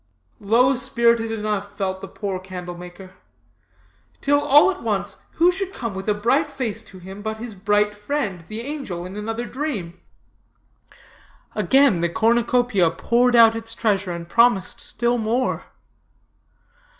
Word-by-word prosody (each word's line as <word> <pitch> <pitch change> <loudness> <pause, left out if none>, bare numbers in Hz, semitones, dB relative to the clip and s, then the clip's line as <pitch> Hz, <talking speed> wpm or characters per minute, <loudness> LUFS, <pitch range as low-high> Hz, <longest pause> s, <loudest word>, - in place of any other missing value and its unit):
Low 235 +6 +3
spirited 235 -2 +1
enough 210 -2 -3
felt 190 -1 -2
the - - -7
poor 195 -3 -4
candle 180 -1 -7
maker; 180 +2 -11 1.1
till 285 +1 +2
all 295 +8 +6
at 380 - -8
once - - -2 0.2
who 345 +2 +4
should 385 +1 -4
come 230 -4 -4
with 190 +2 -4
a 210 - +2
bright 265 +9 +1
face 240 -6 -4
to 200 -4 -14
him 190 +3 -10
but 220 +1 -4
his 230 0 -7
bright 205 +1 +1
friend, 210 - -3
the 215 +1 -6
angel, 245 - -5
in 185 +2 -8
another 225 +3 -4
dream. 240 - -5 1.5
Again 265 -10 +3
the 170 - +1
cornucopia 230 -2 +2
poured 240 +9 +2
out 225 -1 +7
its 225 0 -6
treasure, 200 -5 0
and 170 -1 -6
promised 230 +1 +2
still 240 0 0
more. 235 +4 -1
220 Hz, 145 wpm, -22 LUFS, 195-245 Hz, 1.5 s, out